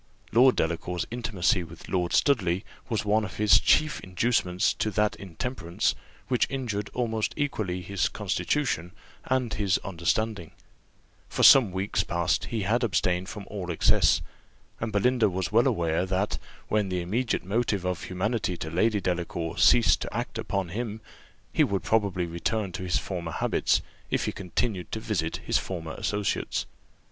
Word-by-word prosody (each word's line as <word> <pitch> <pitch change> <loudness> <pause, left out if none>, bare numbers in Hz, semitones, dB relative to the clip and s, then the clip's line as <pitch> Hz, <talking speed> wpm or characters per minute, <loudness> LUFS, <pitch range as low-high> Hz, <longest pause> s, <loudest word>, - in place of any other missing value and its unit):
Lord 125 +3 +6
Delacour's 85 +2 -1
intimacy 105 -6 0
with 85 - -12
Lord 90 -2 0
Studley 95 -9 +2 0.2
was 110 -3 -1
one 105 +1 +3
of 100 - -6
his 105 -1 +6
chief 155 0 +3
inducements 95 -1 +1
to 110 - -1
that 105 +1 +1
intemperance, 95 -1 -2 0.3
which 125 -2 +2
injured 110 -7 -3
almost 115 -3 -1
equally 105 -11 -2
his 100 0 0
constitution 100 - -1 0.3
and 125 -3 0
his 95 0 +1
understanding: 95 0 -1 0.8
for - - -1
some 125 -8 +8
weeks 95 +3 0
past 85 -1 0
he 110 -3 -3
had 115 +6 +1
abstained 90 -3 0
from 105 -2 -7
all 95 -4 -5
excess, 85 - +3 0.6
and 110 0 -3
Belinda 110 +2 +3
was 95 0 -2
well 115 +4 +4
aware, 85 -8 +1
that, 95 +2 -1 0.3
when 105 -2 +1
the 90 -1 -1
immediate 115 +7 -1
motive 100 -2 0
of 90 -2 -2
humanity 95 0 -1
to 80 - -5
Lady 105 +5 +2
Delacour 85 -2 -2
ceased 100 +8 +5
to - - -4
act - - -4
upon 95 -3 -2
him, 110 +2 -4 0.5
he - - +4
would 100 -1 -1
probably 100 -5 +1
return 90 +4 -2
to 90 - -6
his 90 -1 0
former 85 -4 -4
habits, - - +1 0.3
if - - 0
he - - -1
continued 95 0 -3
to 110 - -2
visit 90 -8 -2
his - - +2
former 85 -4 -5
associates. 105 -1 -1
100 Hz, 155 wpm, -27 LUFS, 90-110 Hz, 0.8 s, some